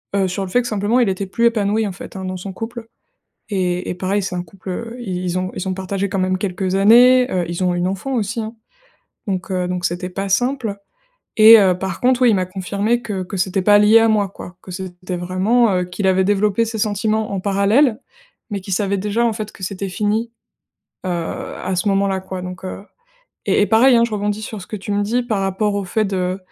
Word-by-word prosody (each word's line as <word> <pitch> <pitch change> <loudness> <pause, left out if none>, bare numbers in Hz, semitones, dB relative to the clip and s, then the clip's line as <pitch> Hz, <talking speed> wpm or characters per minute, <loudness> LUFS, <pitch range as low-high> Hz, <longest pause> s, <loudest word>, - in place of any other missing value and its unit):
heu, 195 -1 +2
sur 185 +2 -3
le 190 - -5
fait 245 - +3
que 240 - -5
simplement 215 +2 +1
il 240 - +3
était 190 +1 -2
plus 230 +5 0
épanoui 215 -1 +1
en - - -4
fait, 185 - -10
hein, 190 - -5
dans 185 0 -4
son 190 +2 -7
couple. 225 +3 -7 0.6
Et 180 -2 -1
et - - -2
pareil, 190 +3 -1
c'est 185 - -4
un 175 - -2
couple, 185 +2 -14
heu, 230 +5 -5
i 185 -6 -4
ils 180 0 -1
ont 185 0 -3
ils 185 - -4
ont 185 - -1
partagé 195 +1 -3
quand 195 0 -3
même 185 0 0
quelques 190 -1 -2
années, 245 +6 +6
heu, 180 -1 0
ils 170 +2 -3
ont 180 - +2
une 175 0 0
enfant 195 +8 -3
aussi, 225 -1 -1
hein, 220 +1 -5 0.7
donc 185 -3 -3
heu, 180 -1 -1
donc 180 0 -3
c'était 175 +1 -2
pas 195 +2 -4
simple 245 0 0 0.6
et 220 +1 +10
heu, 185 -3 +3
par 185 -2 -4
contre, 255 0 +2
oui, 250 - +6
il - - +4
m'a 185 -1 0
confirmé 200 +5 -1
que 195 -5 -4
que 190 +3 -7
c'était 190 +1 0
pas 205 +2 +6
lié 210 +2 +6
à 225 - +4
moi, 210 -3 +2
quoi. 180 -1 -11
Que 185 - -11
c'était 180 0 -6
vraiment 190 +7 +2
heu, 180 - +1
qu'il 180 +2 -3
avait 190 0 +3
développé 205 +2 +2
ses 225 0 -4
sentiments 215 +1 0
en 190 - -2
parallèle, 210 +6 +2 0.5
mais 200 -2 -4
qu'il 195 - -8
savait 200 +1 0
déjà 210 +4 0
en 230 - +1
fait 215 -1 -5
que - - -17
c'était 195 +1 -4
fini, 215 +4 -1 0.8
heu, - - -1
à 175 +2 -4
ce 180 - -1
moment-là 195 -1 +1
quoi, 190 0 -6
donc, 180 +1 -8
heu. 190 +1 -6 0.6
Et - - +3
et - - +4
pareil, 240 +3 +5
hein, 230 - +4
je 235 - -8
rebondis 210 +1 -2
sur 215 -2 -6
ce 180 - -11
que - - -5
tu 200 +1 -6
me 205 0 +1
dis 240 +4 0
par 220 -4 -1
rapport 195 +2 0
au 200 - -1
fait 215 +4 0
de, 185 -2 -1
200 Hz, 240 wpm, -19 LUFS, 185-220 Hz, 0.8 s, et